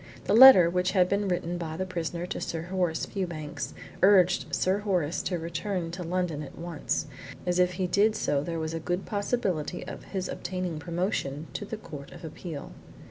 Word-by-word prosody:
The -, -, 0 dB
letter, 235 Hz, -7 st, +10 dB
which 180 Hz, +1 st, 0 dB
had 185 Hz, -3 st, +4 dB
been 200 Hz, +1 st, 0 dB
written 175 Hz, -1 st, -1 dB
by 160 Hz, -2 st, -4 dB
the 185 Hz, -, -1 dB
prisoner 175 Hz, -1 st, -3 dB
to -, -, -5 dB
Sir 165 Hz, -1 st, -3 dB
Horace 180 Hz, -2 st, -1 dB
Fewbanks, 170 Hz, -6 st, -5 dB, 0.3 s
urged 190 Hz, -1 st, +5 dB
Sir 190 Hz, +2 st, +1 dB
Horace 180 Hz, -6 st, 0 dB
to 180 Hz, -, -2 dB
return 170 Hz, +1 st, -3 dB
to 175 Hz, +2 st, -6 dB
London 175 Hz, -3 st, -1 dB
at 145 Hz, -, -9 dB
once, 165 Hz, -2 st, -2 dB, 0.4 s
as 180 Hz, 0 st, +1 dB
if 180 Hz, 0 st, +3 dB
he 185 Hz, +1 st, -1 dB
did 210 Hz, +4 st, +3 dB
so 140 Hz, -1 st, 0 dB
there 165 Hz, +2 st, -3 dB
was 160 Hz, 0 st, -3 dB
a 165 Hz, -, -2 dB
good 175 Hz, +3 st, -2 dB
possibility 200 Hz, -6 st, -2 dB
of -, -, -8 dB
his 190 Hz, -2 st, -3 dB
obtaining 180 Hz, -3 st, -4 dB
promotion 165 Hz, -4 st, -2 dB
to 205 Hz, -, -4 dB
the 220 Hz, -, -5 dB
Court 145 Hz, -9 st, -9 dB
of -, -, -10 dB
Appeal. 160 Hz, -1 st, -7 dB
180 Hz, 190 wpm, -28 LUFS, 165-190 Hz, 0.4 s, letter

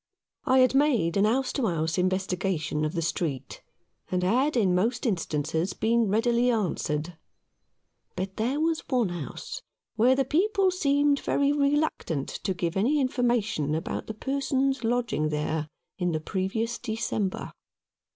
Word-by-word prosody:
I 260 Hz, -, +4 dB
had 255 Hz, -, +4 dB
made 260 Hz, -, +2 dB
a 200 Hz, -, +3 dB
house 250 Hz, +5 st, +1 dB
to 260 Hz, -5 st, 0 dB
house 165 Hz, 0 st, -1 dB
investigation 180 Hz, -4 st, -1 dB
of 155 Hz, -, -2 dB
the 165 Hz, -2 st, -1 dB
street, 155 Hz, -4 st, -3 dB, 0.5 s
and 180 Hz, 0 st, 0 dB
had 255 Hz, +9 st, +2 dB
in 195 Hz, -6 st, +3 dB
most 230 Hz, +9 st, 0 dB
instances 160 Hz, -, -1 dB
been 230 Hz, -1 st, +1 dB
readily 235 Hz, +3 st, +2 dB
answered; 170 Hz, -7 st, -1 dB, 1.0 s
but 190 Hz, +1 st, -4 dB
there 250 Hz, +7 st, 0 dB
was 320 Hz, 0 st, +1 dB
one 245 Hz, -7 st, +2 dB
house 175 Hz, -, -6 dB, 0.4 s
where 245 Hz, +4 st, +5 dB
the 270 Hz, 0 st, +1 dB
people 380 Hz, -, +2 dB
seemed 285 Hz, -4 st, +2 dB
very 280 Hz, 0 st, +1 dB
reluctant 285 Hz, -, 0 dB
to 190 Hz, -3 st, -3 dB
give 170 Hz, -1 st, -2 dB
any 250 Hz, +10 st, +2 dB
information 240 Hz, -, 0 dB
about 160 Hz, -, -4 dB
the 220 Hz, -, -5 dB
persons 270 Hz, +1 st, 0 dB
lodging 235 Hz, -10 st, 0 dB
there 150 Hz, 0 st, -2 dB, 0.3 s
in 180 Hz, -2 st, 0 dB
the 155 Hz, -, 0 dB
previous 200 Hz, +7 st, -2 dB
December. 220 Hz, -4 st, -3 dB
220 Hz, 140 wpm, -27 LUFS, 175-265 Hz, 1.0 s, where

